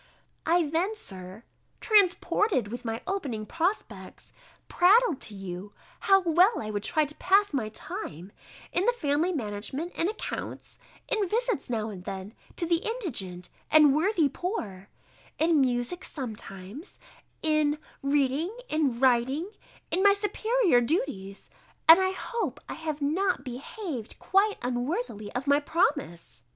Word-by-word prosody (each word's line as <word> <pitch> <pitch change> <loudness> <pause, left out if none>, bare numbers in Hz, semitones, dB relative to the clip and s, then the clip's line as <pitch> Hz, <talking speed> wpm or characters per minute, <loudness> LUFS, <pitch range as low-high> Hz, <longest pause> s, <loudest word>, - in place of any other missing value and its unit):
I 335 -1 +3
then, 345 +8 0
Sir, 190 - -10 0.4
transported 395 - +3
with 240 +3 -6
my 225 -1 -3
opening 285 - -3
prospects, 345 - -3 0.3
prattled 385 - +4
to 210 - -6
you, 195 +1 -7 0.3
how 390 -1 +5
well 360 +5 +4
I 215 -1 -4
would 205 -1 -2
try 310 +8 +1
to 295 - -7
pass 400 -1 +3
my 230 -6 -1
time, 205 - -6 0.4
in 360 - +1
the - - +5
family 310 -3 +1
management 260 - -3
and 340 - +1
accounts, 430 - -6 0.3
in 435 -6 0
visits 465 - 0
now 220 -2 -2
and 185 -3 -9
then 190 +3 -6 0.2
to 345 - -2
the 335 0 +3
indigent 255 - -4 0.2
and 305 -3 +7
worthy 330 -1 +3
poor; 230 - -5 0.5
in 320 -2 +3
music 250 +6 -1
sometimes; 220 - -6 0.5
in 305 -1 +2 0.2
reading, 285 - +1
in 285 -6 +1
writing, 265 - +2 0.4
in 370 - +1
my 400 0 +7
superior 415 - +2
duties 230 - -3 0.4
And 325 +3 +10
I 375 0 +2
hope 380 - -3
I - - -5
have 310 -2 -4
not 350 0 +1
behaved 265 - -6
quite 405 +2 +2
unworthily 245 - -2
of 250 +2 -2
my 285 0 +4
promise. 285 - -1
300 Hz, 135 wpm, -28 LUFS, 230-375 Hz, 0.5 s, And